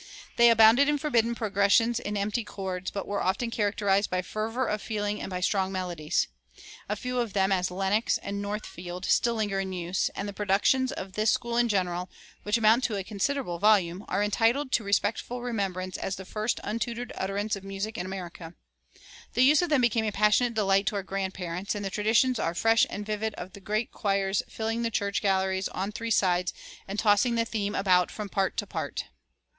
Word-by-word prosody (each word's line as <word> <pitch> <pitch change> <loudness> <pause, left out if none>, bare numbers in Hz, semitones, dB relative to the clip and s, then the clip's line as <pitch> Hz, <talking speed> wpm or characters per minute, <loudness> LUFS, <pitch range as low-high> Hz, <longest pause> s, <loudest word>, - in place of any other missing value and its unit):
They 235 0 +7
abounded 230 +5 +6
in 295 - +2
forbidden 235 -5 +1
progressions 220 +2 +2
and 205 -3 -3
empty 205 +3 -1
chords, 190 -3 -5
but 200 - -5
were 205 - -2
often 230 +5 0
characterized 205 -2 +1
by 185 0 -1
fervor 225 +7 -2
of 210 -2 -2
feeling 210 -1 -2
and - - -5
by 180 -1 -4
strong 190 0 +1
melodies. 175 -5 -1 0.6
A 210 - 0
few 250 +3 -3
of 235 -4 -2
them, 195 -1 +2
as 185 -1 +1
"Lenox" 195 +4 +1
and 200 0 -5
"Northfield," 185 -3 -5
still 235 0 +2
linger 205 -3 -1
in 190 -1 -3
use; 180 +1 -1
and 200 - -3
the 200 - -5
productions 210 +6 +2
of 190 0 -6
this 215 +2 +1
school 235 +2 0
in 240 0 +3
general, 180 -3 -1 0.3
which 210 +2 +1
amount 225 +3 +4
to 220 - -1
a 195 - -2
considerable 205 -1 -2
volume, 195 -3 +3
are 205 - 0
entitled 235 +6 +1
to 225 - +2
respectful 210 +4 -1
remembrance 190 -6 -3
as 190 - -3
the 190 - -9
first 215 +4 -2
untutored 230 +3 -3
utterance 200 +3 -2
of 195 - -9
music 195 +2 -4
in 180 - -4
America. 175 -3 -7 0.8
The 245 - +5
use 290 +5 +6
of 350 - -1
them 295 -4 +3
became 230 -2 +2
a 215 - 0
passionate 210 +4 +3
delight 195 -2 +2
to - - 0
our 200 - -2
grandparents; 190 -1 -3
and 205 -1 -4
the 195 - -3
traditions 225 +5 +2
are 165 - -1
fresh 225 +4 +4
and 205 - -5
vivid 215 0 -2
of 180 +1 -8
the - - -10
great 215 +4 -2
choirs 195 -1 0
filling 225 +1 -2
the 230 - 0
church 200 -2 -1
galleries 190 -1 +1
on 195 +2 -4
three 230 +2 -5
sides, 180 -4 +2 0.3
and 195 +2 -5
tossing 215 +3 +3
the 230 0 +1
theme 210 -2 -2
about 180 -2 +3
from 210 -2 -6
part 195 -1 -1
to 205 - -1
part. 160 -7 -4
205 Hz, 200 wpm, -27 LUFS, 190-225 Hz, 0.8 s, They